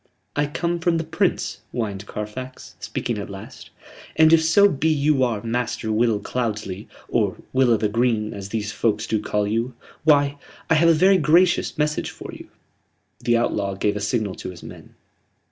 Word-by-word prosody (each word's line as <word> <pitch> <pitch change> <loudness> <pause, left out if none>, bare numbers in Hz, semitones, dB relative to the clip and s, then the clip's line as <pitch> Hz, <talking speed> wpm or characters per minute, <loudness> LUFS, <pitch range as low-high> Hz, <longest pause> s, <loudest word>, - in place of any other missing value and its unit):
"I 145 0 +1
come 170 +3 -2
from 170 0 +1
the 165 - -1
Prince," 165 +4 -1
whined 105 -4 -4
Carfax, 130 +5 -7
speaking - - -3
at - - -6
last; - - -10 0.5
"and 160 0 +6
if 160 -1 +6
so 180 +6 +6
be 160 -3 0
you 145 -3 +2
are 115 -5 -1
Master 115 -1 -2
Will 110 -1 +2
Cloudesley, 105 -4 -3 0.2
or - - 0 0.2
Will 130 -1 +4
o' 115 - +4
th' 105 -1 -1
Green 115 -2 +1
as 100 -1 -7
these 105 -1 -3
folks 110 -1 0
do 110 -2 -1
call 105 -1 -1
you 115 +4 -1 0.3
why, 145 -2 +3 0.3
I - - +8
have 165 +1 +5
a - - +7
very 190 +4 +5
gracious 170 +4 +3
message 150 0 0
for - - -9
you." - - -11 0.7
The 120 -1 +2
outlaw 100 -4 -1
gave 100 +1 0
a - - -2
signal 105 -1 -1
to - - -6
his 90 -2 -11
men. - - -12
120 Hz, 180 wpm, -23 LUFS, 105-155 Hz, 0.7 s, I